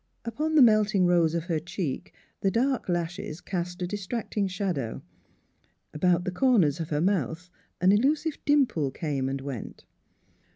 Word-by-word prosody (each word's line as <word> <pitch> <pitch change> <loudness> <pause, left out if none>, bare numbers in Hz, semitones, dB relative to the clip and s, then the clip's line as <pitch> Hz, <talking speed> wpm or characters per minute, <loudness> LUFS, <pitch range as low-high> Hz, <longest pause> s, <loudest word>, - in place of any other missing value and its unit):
Upon 305 +8 -2
the 295 - +8
melting 215 -4 +4
rose 170 -2 +3
of 170 - -1
her 165 -3 -1
cheek 165 -3 -4 0.3
the 195 - +1
dark 250 +1 0
lashes 175 -2 -3
cast 180 0 -4
a - - +1
distracting 205 +2 -3
shadow; 180 - -3 0.9
about 175 +2 +2
the 185 - -2
corners 180 - +3
of 160 - -4
her 150 -1 0
mouth 180 -1 -1 0.3
an 185 +1 +4
elusive 290 +8 +1
dimple 265 - +2
came 135 -2 -2
and 135 0 -3
went. 135 -4 -7
180 Hz, 150 wpm, -27 LUFS, 160-215 Hz, 0.9 s, the